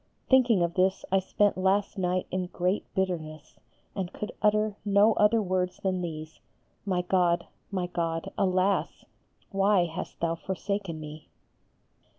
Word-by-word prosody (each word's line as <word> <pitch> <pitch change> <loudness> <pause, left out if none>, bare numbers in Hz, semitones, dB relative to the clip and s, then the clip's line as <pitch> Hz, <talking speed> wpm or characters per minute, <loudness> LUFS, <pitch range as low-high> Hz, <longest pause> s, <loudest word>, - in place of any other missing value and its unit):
thinking 245 -8 +5
of 170 0 -1
this 190 +1 +1
I 195 - +4
spent 200 +1 +1
last 195 +2 +1
night 180 0 0
in 185 -1 -1
great 180 +3 -2
bitterness 155 -5 -3 0.4
and 190 -2 -3
could 210 - -5
utter 210 0 +2
no 205 +2 +4
other 210 +2 +3
words 180 -1 -1
than 185 -2 -1
these, 155 -2 -6 0.5
"My 180 -2 +1
God, 175 -2 +2 0.2
my 185 -3 -1
God, 165 -2 -3
alas! 190 0 +1 0.5
why 195 -2 +3
hast 165 -1 -6
Thou 165 0 0
forsaken 190 0 -4
me." 155 0 -9
185 Hz, 140 wpm, -28 LUFS, 175-200 Hz, 0.5 s, thinking